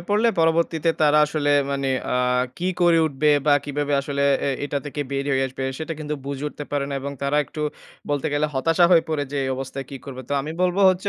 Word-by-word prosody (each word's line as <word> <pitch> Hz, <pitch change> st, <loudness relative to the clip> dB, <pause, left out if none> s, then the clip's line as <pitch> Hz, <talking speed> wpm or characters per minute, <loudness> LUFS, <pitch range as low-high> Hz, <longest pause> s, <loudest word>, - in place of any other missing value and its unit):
পড়লে 210 Hz, +3 st, +3 dB
পরবর্তীতে 165 Hz, 0 st, +2 dB
তারা 150 Hz, 0 st, +5 dB
আসলে 150 Hz, -1 st, 0 dB, 0.2 s
মানে 140 Hz, -1 st, -1 dB, 0.3 s
আ -, -, +2 dB, 0.4 s
কি 180 Hz, +2 st, -1 dB
করে 170 Hz, -1 st, +5 dB
উঠবে 150 Hz, +1 st, +1 dB, 0.2 s
বা 145 Hz, -, +6 dB
কিভাবে 145 Hz, 0 st, -2 dB
আসলে 140 Hz, 0 st, -2 dB, 0.2 s
এ -, -, +2 dB
এটা 145 Hz, 0 st, -2 dB
থেকে 145 Hz, +1 st, -4 dB
বের 140 Hz, 0 st, -1 dB
হয়ে 135 Hz, 0 st, +2 dB
আসবে? 130 Hz, +1 st, -5 dB
সেটা 160 Hz, +1 st, -4 dB
কিন্তু 150 Hz, 0 st, -3 dB
বুঝে 140 Hz, 0 st, -4 dB
উঠতে 145 Hz, -, -8 dB
পারে 145 Hz, -1 st, 0 dB
না। 140 Hz, -, -2 dB
এবং 140 Hz, +1 st, -5 dB
তারা 140 Hz, +2 st, +1 dB
একটু 150 Hz, +4 st, -6 dB, 0.5 s
বলতে 145 Hz, +1 st, 0 dB
গেলে 150 Hz, +1 st, +1 dB
হতাশা 165 Hz, +6 st, +3 dB
হয়ে 170 Hz, -2 st, +6 dB
পড়ে 150 Hz, -2 st, -1 dB
যে -, -, -2 dB
এই -, -, -2 dB
অবস্থায় 135 Hz, +1 st, -5 dB
কী 135 Hz, -, -6 dB
করবে? 130 Hz, -2 st, -7 dB
তো -, -, -3 dB
আমি 150 Hz, +3 st, -5 dB
বলব 180 Hz, 0 st, +1 dB
হচ্ছে, 185 Hz, +2 st, -2 dB
145 Hz, 220 wpm, -23 LUFS, 140-160 Hz, 0.5 s, বা